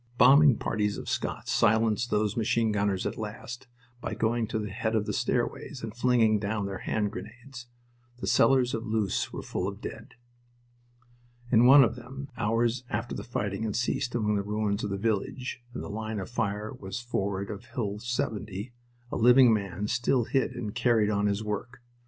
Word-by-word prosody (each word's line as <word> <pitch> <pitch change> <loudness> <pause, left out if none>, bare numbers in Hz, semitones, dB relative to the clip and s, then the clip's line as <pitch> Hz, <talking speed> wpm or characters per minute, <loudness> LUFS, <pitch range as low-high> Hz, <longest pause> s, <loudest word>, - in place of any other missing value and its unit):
Bombing 140 -1 +7
parties 105 -2 -1
of - - -7
Scots - - -3
silenced 110 +2 +2
those 105 -1 +1
machine 115 0 +1
gunners 100 -2 0
at - - -3
last 115 +4 -7 0.3
by - - -4
going 115 0 0
to 110 - -2
the 105 -2 -4
head 110 +2 -1
of 105 -1 +1
the - - -2
stairways 130 -4 -2
and 110 -1 -5
flinging 120 -3 +3
down 105 0 -2
their 95 -1 -4
hand 105 -2 -1
grenades. 125 +3 -9 0.5
The - - -5
cellars 130 -2 +4
of 115 - -2
Loos 110 -3 0
were - - -6
full 90 - -3
of 100 +1 -5
dead. 125 +1 -8 1.4
In 120 0 +6
one 140 +1 +9
of 115 -1 +1
them, 135 +3 -9
hours 115 +2 0
after 110 +3 -3
the - - -5
fighting 105 -3 -3
had 110 -2 -2
ceased 125 +1 -1
among 105 -3 +1
the - - 0
ruins 105 0 -1
of 105 - -2
the 100 - -2
village, 115 +5 -2
and 125 - -6
the - - -6
line 110 +1 -4
of 95 - -6
fire 105 -2 -2
was 95 +3 -6
forward 100 -5 -2
of 105 +3 -8
Hill 115 -5 -3
70, 110 -1 -3 0.4
a - - -2
living 125 +1 +6
man 100 -2 -2
still 120 +2 +1
hid 135 +3 0
and 105 -3 -4
carried 115 -3 +2
on 100 0 +1
his 100 +1 -1
work. 115 +4 -4
110 Hz, 185 wpm, -28 LUFS, 105-120 Hz, 1.4 s, one